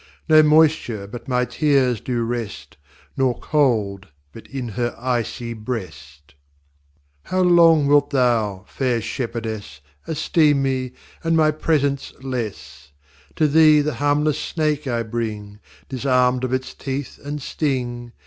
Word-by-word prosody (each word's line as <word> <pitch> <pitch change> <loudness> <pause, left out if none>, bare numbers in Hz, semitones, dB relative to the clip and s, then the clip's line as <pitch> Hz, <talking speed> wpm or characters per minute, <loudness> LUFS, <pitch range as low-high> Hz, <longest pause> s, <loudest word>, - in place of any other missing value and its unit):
No 155 -1 +7
moisture 150 -9 +3
but 115 +3 -9
my 125 -1 +1
Tears 130 -3 +1
do 120 -2 -2
rest, 100 -11 -5 0.4
Nor 130 -2 +1
Cold 110 -10 0 0.3
but 115 - -12
in 130 -3 -5
her 120 +2 -2
Icy 120 -1 -2
Breast. 90 - -7
V 70 0 -31
How 185 0 +1
long 170 -4 +5
wilt 145 0 +4
Thou, 115 -7 +1
fair 125 -3 -1
Shepheardess, 115 - -5 0.3
Esteem 150 -2 +2
me, 130 -2 -2 0.3
and 165 0 +2
my 155 -1 +4
Presents 145 -3 -1
less? 100 - -6 0.4
To 155 - +3
Thee 155 0 +6
the 150 0 -1
harmless 145 +1 +1
Snake 150 -3 -1
I 120 -2 -1
bring, 110 -3 -5 0.3
Disarmed 125 -1 +1
of 130 - -1
its 130 0 -2
teeth 135 0 -5
and 145 +1 -4
sting. 125 -5 -3
125 Hz, 130 wpm, -21 LUFS, 110-145 Hz, 0.4 s, No